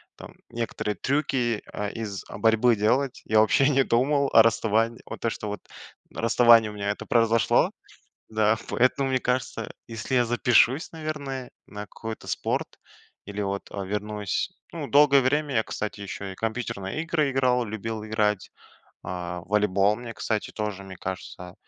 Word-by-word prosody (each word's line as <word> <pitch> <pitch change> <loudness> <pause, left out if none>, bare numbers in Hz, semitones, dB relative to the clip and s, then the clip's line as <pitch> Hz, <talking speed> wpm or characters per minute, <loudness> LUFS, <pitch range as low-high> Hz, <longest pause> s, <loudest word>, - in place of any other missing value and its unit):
там, - - -11 0.2
некоторые 115 -2 -3
трюки, 130 - 0
э, 105 0 -3
из 105 -4 -5
борьбы 115 +1 +3
делать, 125 +6 0
я 110 0 +3
вообще 135 +6 +4
не 135 -1 +4
думал 140 +4 +2
о 115 - +8
расставании. 115 0 +1
Вот - - -8
то, 115 - 0
что 105 - -5
вот 105 -2 -5 0.5
расставание 115 -1 +5
у - - -8
меня 100 0 -1
это 105 - -7
произошло. 115 -1 +3 0.6
Да. 110 0 +3
Поэтому 135 +2 +2
мне 130 - +2
кажется, 125 0 -2 0.2
если 115 +2 -5
я 125 - +5
запишусь, 120 +4 +3
наверное, 145 -5 -5 0.2
на 105 0 -8
какой-то 110 +3 -8
спорт - - -1 0.6
или, 100 +1 -5
вот, 100 0 -4
э, 100 -1 -4
вернусь 105 -1 -2 0.2
Ну, - - -5
долгое 140 -1 +6
время 145 +1 0
я, 110 - +3
кстати, 105 -1 -5
ещё 100 0 -6
и - - -9
компьютерные 110 +1 -3
игры 160 -4 0
играл, 125 -2 +2
любил 110 0 -5
играть, 105 -2 0 0.5
а 90 -1 -5
волейбол, 100 +1 +2
мне, 120 0 -8
кстати, 110 -1 -2
тоже, 105 -2 -4
мне 95 -1 -10
кажется, 90 -1 -7
115 Hz, 155 wpm, -26 LUFS, 105-125 Hz, 0.6 s, о